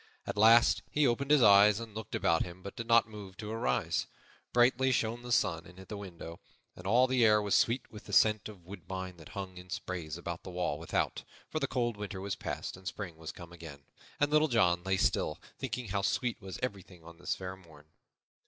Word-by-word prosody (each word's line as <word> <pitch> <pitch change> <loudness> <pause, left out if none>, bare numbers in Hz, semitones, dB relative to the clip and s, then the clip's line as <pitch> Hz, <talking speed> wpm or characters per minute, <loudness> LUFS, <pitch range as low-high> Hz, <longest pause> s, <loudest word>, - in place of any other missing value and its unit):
At - - -4
last 115 +3 +6
he 150 -1 +2
opened 135 +3 +1
his 150 -4 +6
eyes 105 0 +7
and 115 -2 -8
looked 110 -1 -6
about 85 -1 +2
him 90 +1 -6
but 100 - -8
did 115 - -6
not 115 -1 +5
move 105 -3 -10
to 105 -1 -6
arise. 110 -6 0 0.4
Brightly 125 +2 +4
shone 120 -1 0
the 120 0 -7
sun 85 -7 +1
in 90 +2 -15
at 95 - -12
the 105 - -5
window, 85 -4 -8 0.4
and 90 - -8
all 120 +5 +5
the 130 -2 +2
air 105 -1 +6
was 105 -1 -1
sweet 120 +1 +2
with 105 -2 -11
the - - -9
scent 110 -1 +4
of 95 -5 -13
woodbine 95 -1 -7
that 80 -3 -13
hung 95 -2 -5
in 90 +1 -11
sprays 85 -5 -4
about 85 0 -5
the - - -9
wall 90 -4 -2
without, 80 - -1 0.3
for 155 - -1
the 140 - 0
cold 120 -4 -1
winter 100 -2 -5
was 100 0 -3
past - - -5
and 95 0 -11
spring 95 -5 -5
was 80 0 -7
come 85 -1 -12
again, 80 -4 -10 0.4
and 145 0 +2
Little 155 +1 +5
John 90 - +3
lay 95 0 +1
still, 80 -3 +1 0.2
thinking 125 -3 -4
how 100 +1 0
sweet 115 +3 -1
was 95 -1 -7
everything 95 -7 -5
on 85 0 -13
this - - -2
fair 95 0 -6
morn. 80 -5 -17
100 Hz, 220 wpm, -31 LUFS, 90-115 Hz, 0.4 s, eyes